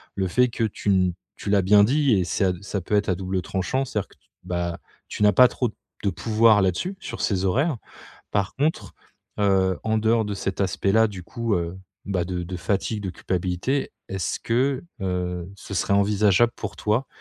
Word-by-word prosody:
le 95 -1 0
fait 125 +7 +3
que 115 - -2
tu 105 -1 -3
n 95 -2 +3 0.2
tu 100 - -5
l'as 100 -2 +3
bien 100 +2 +6
dit, 140 +3 +3
et 95 -4 +2
ça 95 0 +1
ça 100 0 -3
peut 105 +4 -1
être 100 -1 +1
à 90 - +2
double 95 0 -2
tranchant, 95 +10 -1
c'est-à-dire 105 -5 -3
que - - -22
tu, 65 - -37
bah, 85 -1 -3 0.3
tu 105 - -2
n'as 105 -1 +6
pas 125 +5 +8
trop 125 -3 -1 0.3
de 100 - +2
pouvoir 110 +1 +4
là-dessus, 95 - 0
sur 115 -5 -6
ces 95 -3 0
horaires. 135 - +1 0.6
Par 100 -1 0
contre, 150 +4 -1 0.5
heu, 95 -2 +2
en 110 0 +1
dehors 110 0 +2
de 105 - -3
cet 95 0 -3
aspect-là, 100 +3 +2
du 95 -3 -8
coup, 115 -1 -2
heu, 85 0 -2 0.3
bah, 95 -3 0
de 90 -1 -3
de 90 +1 -5
fatigue, 100 +4 -1
de 95 - -3
culpabilité, 95 +11 -2 0.2
est-ce 95 -3 -2
que, 130 +5 0 0.2
heu, 90 -1 -2
ce 100 +1 -8
serait 100 +3 +1
envisageable, 105 +3 +3
pour - - -6
toi, 110 +6 0
100 Hz, 195 wpm, -24 LUFS, 90-115 Hz, 0.6 s, pas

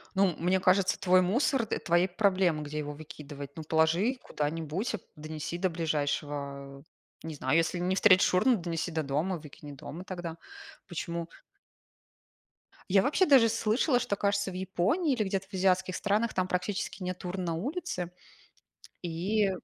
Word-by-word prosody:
Ну, 190 -3 +3
мне 180 +3 +2
кажется, 185 0 +3
твой 185 0 +5
мусор, 235 - +1
э- - - 0
твои 175 +2 +2
проблемы, 185 -5 +2
где 150 +1 -5
его 150 -1 -4
выкидывать. 145 -2 -9
Ну, 160 - -5
положи 165 - +2
куда-нибудь, 160 +7 -2 0.2
донеси 155 +2 -5
до 185 -1 +1
ближайшего, 145 -3 -3
э, - - -17 0.4
не 160 -1 -6
знаю, 135 +2 +1
если 165 +2 +1
не 180 +2 0
встретишь 190 -2 +5
урну, 240 +6 +4
донеси 170 -1 -3
до 160 -1 -1
дома, 155 +6 -1
выкини 150 -1 -11
дома 160 +5 -8
тогда. 175 -3 -6 0.5
Почему? 170 -1 -4 1.7
Я 195 -1 +6
вообще 305 - +3
даже 265 -8 +6
слышала, 225 +4 +2
что 200 - -1
кажется 200 0 0
в - - -9
Японии, 190 - 0
или 225 - 0
где-то 195 -1 -2
в 205 - -15
азиатских 185 -1 +2
странах, 215 +3 0
там 185 0 0
практически 185 +1 -2
нет 180 0 -5
урн 180 +1 -3
на 170 - -1
улице 220 - -3 0.9
и 190 +5 0
180 Hz, 155 wpm, -29 LUFS, 160-195 Hz, 1.7 s, Я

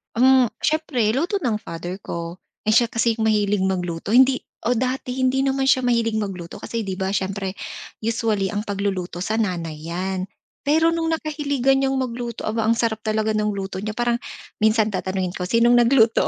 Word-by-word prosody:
Hmm, 260 +1 +5 0.2
siyempre 300 -8 +1
luto 350 - 0
ng 220 -4 0
father 175 0 -6
ko. 170 -1 -6 0.2
Eh, 215 - +2
siya 235 +2 +5
kasi 230 0 +1
yung 220 -1 0
mahilig 205 -2 +2
magluto, 180 -1 -2
hindi 260 +2 +5 0.3
o 245 - +3
dati 255 +1 -2
hindi 260 +1 +2
naman 270 0 +1
siya 255 - +4
mahilig 230 -2 +1
magluto 185 -5 -5
kasi 230 -1 -4
'di 190 -2 -3
ba, 190 0 -1
siyempre 195 0 -2 0.5
usually 220 -3 0
ang 205 0 -2
pagluluto 195 -3 -2
sa 220 - -1
nanay 175 -7 -2
'yan. 185 +2 -3 0.4
Pero 320 +2 +4
nung 330 -1 -1
nakahiligan 285 -4 +1
niyang 270 0 +1
magluto, 240 -2 -3
aba, 220 0 -1
ang 230 - +4
sarap 225 -2 0
talaga 220 0 0
ng 210 -1 0
luto 195 -1 -4
niya. 215 +1 -4
Parang 240 0 +1 0.4
minsan 220 0 +3
tatanungin 185 -1 -2
ko, 180 0 -4
"Sino 230 +3 +4
nung 245 - +6
nagluto?" 235 -2 +4
220 Hz, 180 wpm, -22 LUFS, 195-250 Hz, 0.5 s, nung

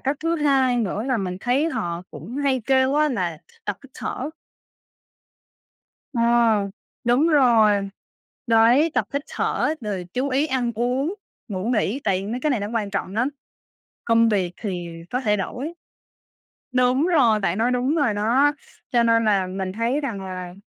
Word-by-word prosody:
cách 275 +2 -1
thứ 330 +1 0
hai 270 -4 +2
nữa 210 -3 -1
là 260 -1 +1
mình 185 -4 -3
thấy 260 +8 +1
họ 170 - -3
cũng 165 - -8
hay 275 -3 0
kêu 265 0 +3
á 300 +1 +3
là 180 - -2 0.3
tập 205 -1 -3
hít 275 - -14
thở. 275 +4 -4 1.8
Ờ. 235 - 0 0.8
Đúng 245 +7 +3
rồi, 225 -9 +4 0.6
đấy, 235 +8 +5
tập - - +1
hít 280 - 0
thở, 305 - 0
rồi 195 -5 -4
chú 265 +3 -1
ý 275 +3 +2
ăn 255 -4 0
uống, 255 - 0 0.3
ngủ 190 -3 -4
nghỉ, 235 +1 0
tại 195 0 0
mấy 235 +4 -3
cái 305 - +1
này 255 -6 +1
nó 205 - -3
quan 215 -3 -1
trọng 190 - -3
lắm. 245 +5 +1 0.8
Công 230 0 +4
việc 190 -5 0
thì 180 -5 -3 0.2
có 250 - -1
thể 210 -4 +1
đổi. 255 - -4 1.0
Đúng 255 +5 +3
rồi! 250 -11 +4
Bạn 190 -2 0
nói 235 +3 +2
đúng 250 +4 +1
rồi 285 -9 +2
đó. 240 +8 +3 0.4
Cho 240 -1 +3
nên 230 -1 +3
là 195 -3 +2
mình 185 0 -4
thấy 235 +7 0
rằng 230 -9 -4
là 185 -2 -6
235 Hz, 170 wpm, -23 LUFS, 205-270 Hz, 1.8 s, đấy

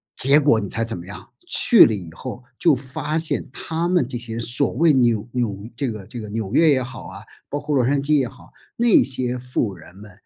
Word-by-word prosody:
结 140 +4 +7
果 140 -7 +3
你 100 - -5
猜 115 - -1
怎 115 0 -3
么 85 +1 -10
样， 105 - -11 0.2
去 235 - +6
了 115 - 0
以 90 -6 -7
后 125 +6 -8 0.2
就 165 -5 +4
发 135 +4 -4
现 165 0 -1
他 165 +2 -3
们 175 -9 +1
这 130 - -5
些 115 -1 -5
所 120 +4 0
谓 160 +4 +3
纽 120 -4 +1
纽 110 -4 -3
这 130 0 -2
个 105 -3 -9
这 115 +4 -9
个 105 - -8
纽 110 -1 -5
约 160 +2 +5
也 130 -3 +2
好 130 +1 -9
啊， - - -11 0.3
包 145 - -3
括 150 - -3
洛 130 - +3
杉 140 +3 +1
矶 145 +1 +2
也 130 - -1
好， - - -18 0.2
那 235 -2 +4
些 125 -1 -2
富 125 -4 -2
人 90 +2 -15
们， 105 -1 -13
125 Hz, 250 characters per minute, -21 LUFS, 110-145 Hz, 0.3 s, 结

